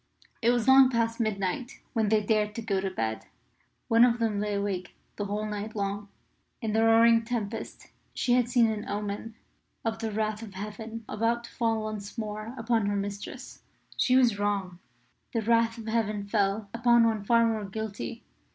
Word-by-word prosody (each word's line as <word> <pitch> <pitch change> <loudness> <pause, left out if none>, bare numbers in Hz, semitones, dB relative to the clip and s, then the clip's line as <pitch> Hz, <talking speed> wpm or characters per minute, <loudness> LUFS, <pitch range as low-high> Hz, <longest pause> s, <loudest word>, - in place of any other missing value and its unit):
It 230 - +3
was 240 0 +2
long 265 0 +8
past 230 -1 0
midnight 215 +3 -2
when 220 -4 +1
they 215 0 +3
dared 210 -1 +1
to 230 - -4
go 200 -4 0
to 195 - -1
bed. 110 -11 -3 0.6
One 230 +1 +6
of 240 -1 +4
them 225 -3 0
lay 210 0 -1
awake 200 -3 -3 0.2
the 205 - -3
whole 205 +1 -2
night 210 +1 -5
long. 200 0 -3 0.5
In 220 -3 -2
the 220 +1 +3
roaring 230 0 +6
tempest 225 -2 -5 0.2
she 245 - 0
had 245 -1 +3
seen 240 -1 +4
an 210 0 -5
omen 205 +2 -4 0.5
of 225 0 -1
the 225 -1 -3
wrath 215 0 -1
of 210 -4 -9
Heaven 220 +3 -7
about 230 +2 0
to - - -11
fall 225 -2 0
once 215 0 -6
more 215 +2 -5
upon 225 -2 +1
her 205 - 0
mistress. 200 0 -6 0.3
She 255 - +3
was 240 -6 +4
wrong. 195 -4 -1 0.6
The 225 - +1
wrath 230 +1 +2
of 225 - -8
Heaven 215 -2 -1
fell 200 0 0
upon 235 0 +4
one 220 -3 0
far 230 +2 +4
more 220 -2 0
guilty. 220 +3 -5
220 Hz, 180 wpm, -28 LUFS, 205-230 Hz, 0.6 s, long